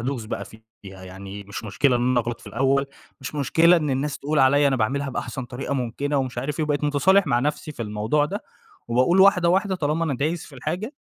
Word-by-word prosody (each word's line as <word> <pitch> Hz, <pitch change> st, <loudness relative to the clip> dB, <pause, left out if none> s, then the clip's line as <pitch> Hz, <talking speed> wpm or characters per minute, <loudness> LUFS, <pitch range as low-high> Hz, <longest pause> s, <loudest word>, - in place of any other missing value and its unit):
أدوس 125 Hz, -1 st, -3 dB
بقى 100 Hz, -2 st, -5 dB
فيها. 110 Hz, +3 st, -16 dB, 0.2 s
يعني 95 Hz, +1 st, -9 dB
مش 100 Hz, +3 st, -7 dB
مشكلة 120 Hz, +6 st, +2 dB
إن 125 Hz, +1 st, +1 dB
أنا 125 Hz, -1 st, +3 dB
أغلط 120 Hz, 0 st, -5 dB
في -, -, -17 dB
الأول، 135 Hz, +3 st, +1 dB, 0.3 s
مش 135 Hz, +3 st, -7 dB
مشكلة 165 Hz, +5 st, +4 dB
إن 150 Hz, -4 st, -1 dB
الناس 140 Hz, +2 st, -2 dB
تقول 150 Hz, +2 st, -1 dB
عليّا 140 Hz, +2 st, +5 dB
أنا 135 Hz, -, +1 dB
باعملها 135 Hz, +5 st, -1 dB
بأحسن 125 Hz, 0 st, -4 dB
طريقة 130 Hz, +3 st, -5 dB
مُمكنة 140 Hz, +3 st, -2 dB
ومش 130 Hz, -3 st, -2 dB
عارف 140 Hz, +5 st, -3 dB
إيه، 155 Hz, -, +1 dB
وبقيت 150 Hz, -1 st, -1 dB
مُتصالح 175 Hz, +6 st, +3 dB
مع 120 Hz, -4 st, +2 dB
نفسي 150 Hz, +2 st, -2 dB
في 120 Hz, -, -6 dB
الموضوع 110 Hz, +7 st, 0 dB
ده 200 Hz, +8 st, -4 dB, 0.5 s
وباقول 130 Hz, +11 st, +3 dB
واحدة، 180 Hz, -3 st, +5 dB
واحدة 190 Hz, +2 st, +2 dB
طالما 160 Hz, -1 st, -1 dB
أنا 145 Hz, -, -1 dB
دايس 155 Hz, +6 st, -2 dB
في 140 Hz, -, -15 dB
الحاجة 175 Hz, -, -4 dB
140 Hz, 215 wpm, -23 LUFS, 120-150 Hz, 0.5 s, عليّا